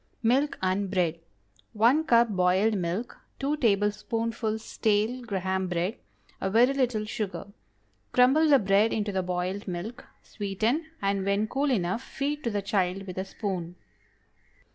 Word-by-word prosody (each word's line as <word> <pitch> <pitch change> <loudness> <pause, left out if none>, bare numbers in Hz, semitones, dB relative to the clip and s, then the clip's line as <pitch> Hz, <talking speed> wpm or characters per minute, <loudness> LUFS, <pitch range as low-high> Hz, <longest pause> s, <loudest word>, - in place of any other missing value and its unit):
MILK 265 +6 +2
AND 190 +1 0
BREAD. 180 -4 +1
✠ - - -29 0.5
1 245 +9 +4
cup 235 -4 +4
boiled 190 +2 +2
milk. 185 +5 -3 0.2
2 285 +2 -1
tablespoonfuls 220 0 0
stale 220 +4 0
Graham 190 -4 -2
bread. 180 +5 -1 0.4
A 190 - 0
very 240 +6 +4
little 245 -6 0
sugar. 210 -2 -4 0.7
Crumble 270 +6 +5
the 285 - +7
bread 200 0 +3
into 210 -1 -1
the 190 -1 0
boiled 180 +3 -3
milk, 200 +8 -5 0.2
sweeten, 220 - -2 0.2
and 195 -1 +1
when 200 +2 +1
cool 275 +5 0
enough, 195 -2 0
feed 290 +3 -3
to - - +2
the 205 -2 -2
child 195 -1 0
with 185 -1 -6
a 190 - -2
spoon. 185 -4 -4
210 Hz, 145 wpm, -27 LUFS, 190-240 Hz, 0.7 s, the